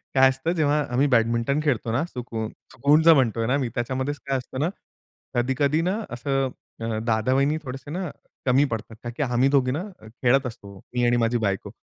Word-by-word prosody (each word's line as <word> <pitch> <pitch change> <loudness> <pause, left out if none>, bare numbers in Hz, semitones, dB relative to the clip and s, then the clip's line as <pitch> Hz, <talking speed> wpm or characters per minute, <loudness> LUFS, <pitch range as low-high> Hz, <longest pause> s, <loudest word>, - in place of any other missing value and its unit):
काय 130 0 +7
असतं, 135 +6 -1
जेव्हा 150 -3 +2
आम्ही 140 +4 +3
बॅडमिंटन 115 +3 +2
खेळतो 120 -6 0
ना, 130 +7 +1
सुकून 115 -7 -5 0.2
सुकूनचं 150 +5 +5
म्हणतोय 115 -5 +2
ना 135 +3 +2
मी, 130 -4 -1
त्याच्यामध्येच 130 +4 -2
काय 135 -1 +1
असतं 130 +1 -6
ना, 160 +4 +1 0.7
कधी-कधी 135 +5 +1
ना 185 +5 0
असं 135 +2 -1 0.3
अ, 115 -1 -2
दादा-वहिनी 130 +7 +2
थोडेसे 135 +2 -7
ना 180 -1 -3 0.4
कमी 135 +3 +4
पडतात. 110 0 -4
का 120 - -4
की 150 - +1
आम्ही 125 +1 +2
दोघी 130 -3 +3
ना 155 +7 -2 0.2
खेळत 125 +4 +1
असतो, 100 -4 -10 0.2
मी 120 -1 +1
आणि 120 0 +3
माझी 120 +1 +2
बायको. 100 -4 -2
130 Hz, 180 wpm, -24 LUFS, 120-145 Hz, 0.7 s, काय